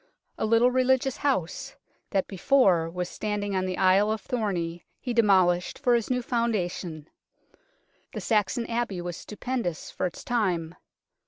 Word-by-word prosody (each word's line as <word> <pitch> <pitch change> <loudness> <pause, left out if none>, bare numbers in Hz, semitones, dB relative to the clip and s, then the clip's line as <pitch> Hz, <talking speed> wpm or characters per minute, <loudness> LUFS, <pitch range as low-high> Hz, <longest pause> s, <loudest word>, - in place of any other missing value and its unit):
A - - -1
little 230 +3 +4
religious 260 +1 +2
house 255 - -1 0.3
that 195 -2 +1
before 190 -5 +3
was 180 +1 -3
standing 205 0 -3
on 185 0 0
the 185 - -3
Isle 195 +3 +4
of 220 - -1
Thorney 175 -8 -2 0.2
he 245 - -3
demolished 185 -6 +3
for 245 - +2
his 235 -2 +1
new 250 -1 0
founda 230 -7 0
tion. 160 -5 -7 1.1
The - - -3
Saxon 220 +2 +1
Abbey 230 -5 -2
was 175 -1 -4
stupendous 215 -5 -4
for - - -1
its 175 - -9
time. 180 -9 0
205 Hz, 150 wpm, -27 LUFS, 180-240 Hz, 1.1 s, little